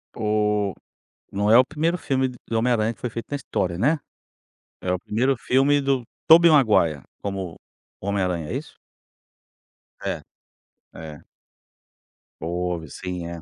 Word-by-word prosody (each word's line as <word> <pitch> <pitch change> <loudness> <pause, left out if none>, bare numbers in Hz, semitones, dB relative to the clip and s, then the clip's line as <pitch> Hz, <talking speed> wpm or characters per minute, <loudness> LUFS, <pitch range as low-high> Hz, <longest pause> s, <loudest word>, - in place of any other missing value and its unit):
Oh, 105 -2 +1 0.6
não 100 +1 0
é 115 - +8
o 130 - +7
primeiro 160 +5 -1
filme 135 -4 0
do 120 -2 -4
Homem 125 +2 +2
Aranha 110 0 +1
que - - -27
foi 125 - -3
feito 115 0 -6
na 145 - -1
história, 90 -10 -2
né? 145 - +2 0.8
É 90 - -1
o 90 - 0
primeiro 125 +9 0
filme 135 +4 +3
do 135 -2 +1 0.2
Tobey 170 +1 +8
Maguire, 105 - +4 0.2
como 95 -4 -4 0.5
o - - -8
Homem 100 -1 0
Aranha, 85 -4 -2
é - - -2
isso? - - -8 1.3
É, - - -2 0.7
é. 75 -2 -9 1.2
Houve 85 -1 -3
sim 90 +3 -5
é. 85 -1 -7
105 Hz, 150 wpm, -24 LUFS, 90-130 Hz, 1.3 s, é